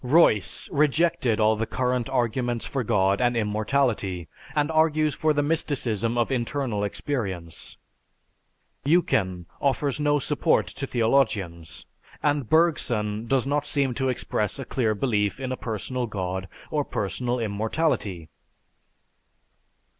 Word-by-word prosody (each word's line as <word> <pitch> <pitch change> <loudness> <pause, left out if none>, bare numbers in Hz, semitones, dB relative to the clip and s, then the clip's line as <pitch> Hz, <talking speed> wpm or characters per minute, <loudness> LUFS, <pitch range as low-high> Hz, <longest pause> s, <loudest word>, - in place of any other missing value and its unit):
Royce 125 - +3
rejected 150 -4 +2
all 110 0 +4
the 110 +1 -2
current 125 0 -1
arguments 120 -1 0
for 135 -3 -2
God 100 -2 +2
and 120 -1 +2
immortality 105 - 0 0.3
and 150 +1 +1
argues 155 -1 +3
for 155 +3 +1
the 145 -1 +1
mysticism 120 -7 0
of 120 +2 +1
internal 120 -3 -1
experience. 95 - -4 1.1
Eucken 95 - +1 0.2
offers 140 +1 0
no 145 0 +3
support 140 - +2
to - - -6
theologians; 110 - 0 0.4
and 145 -5 +1
Bergson 120 -10 +1
does 135 0 +2
not 145 +1 0
seem 140 -4 +1
to 130 +2 0
express 105 -4 -1
a 135 - -5
clear 115 -4 0
belief 105 -2 0
in 130 -1 -3
a - - -1
personal 120 +2 -3
god 95 -2 -3 0.2
or - - +1
personal 125 0 -2
immortality. 110 - -1
120 Hz, 125 wpm, -25 LUFS, 105-140 Hz, 1.1 s, all